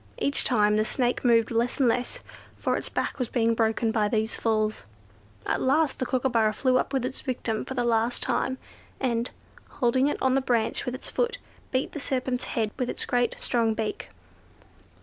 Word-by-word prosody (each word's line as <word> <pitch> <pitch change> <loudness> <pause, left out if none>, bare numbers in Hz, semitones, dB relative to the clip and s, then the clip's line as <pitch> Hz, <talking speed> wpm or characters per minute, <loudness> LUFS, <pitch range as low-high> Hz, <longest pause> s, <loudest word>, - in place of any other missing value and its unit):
Each 280 - +1
time 210 -4 +3
the 215 - +3
Snake 245 +2 0
moved 230 -2 +4
less 235 +3 0
and 265 - +4
less, 245 +2 -1 0.4
for - - 0
its - - -4
back - - -2
was 250 - -1
being 230 -2 +2
broken 225 0 +1
by 215 -2 +2
these 220 +1 0
falls. 215 - 0 0.6
At - - 0
last 285 +2 +2
the 255 - -1
Kookooburra 235 -4 +2
flew 255 +3 +2
up - - -2
with 265 -3 0
its 255 - -2
victim 240 -5 -2
for 265 - -6
the 245 - +1
last 235 0 +1
time, 260 0 0 0.4
and, 240 -2 0 0.4
holding 255 +2 +2
it 290 - -1
on 260 -1 +2
the 270 - +3
branch 235 -3 0
with 250 - -1
its 260 - -9
foot, - - 0 0.3
beat 260 0 -1
the 300 - -5
serpent's 255 -2 -1
head 220 -2 -1
with 250 -1 0
its - - -3
great 245 -1 +1
strong 225 -2 +1
beak. 220 -1 -3
245 Hz, 190 wpm, -26 LUFS, 225-260 Hz, 0.6 s, moved